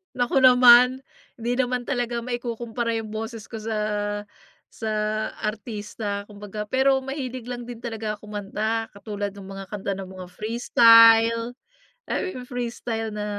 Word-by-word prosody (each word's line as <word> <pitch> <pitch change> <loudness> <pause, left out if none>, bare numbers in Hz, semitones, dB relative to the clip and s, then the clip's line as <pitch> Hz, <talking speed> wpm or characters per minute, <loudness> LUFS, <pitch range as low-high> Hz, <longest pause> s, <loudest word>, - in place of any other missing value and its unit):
Naku 250 +2 +1
naman. 250 0 +7 0.4
Hindi 235 +2 -2
naman 250 -1 -1
talaga 245 -3 -1
maikukumpara 235 -1 -3
yung 215 -1 -7
boses 225 0 -6
ko - - -9
sa 220 0 -3 0.9
sa 220 -1 -4 0.5
artista 210 -1 -4
kumbaga. 210 0 -7
Pero 265 +2 +3
mahilig 260 -3 -5
lang 245 -1 -5
din 240 -2 -8
talaga 220 -2 -3
ako 210 - -14
kumanta, 215 +2 -2
katulad 205 -1 -4
nung 195 -1 -10
mga 195 0 -8
kanta 200 -1 -3
ng 195 -1 -7
mga 185 -1 -9
Freestyle. 230 +1 +6 0.7
Ay, 370 - -2
yu - - -6
yung 250 - -11
Freestyle 235 -2 -3
na, 210 0 -4
230 Hz, 145 wpm, -24 LUFS, 210-245 Hz, 0.9 s, naman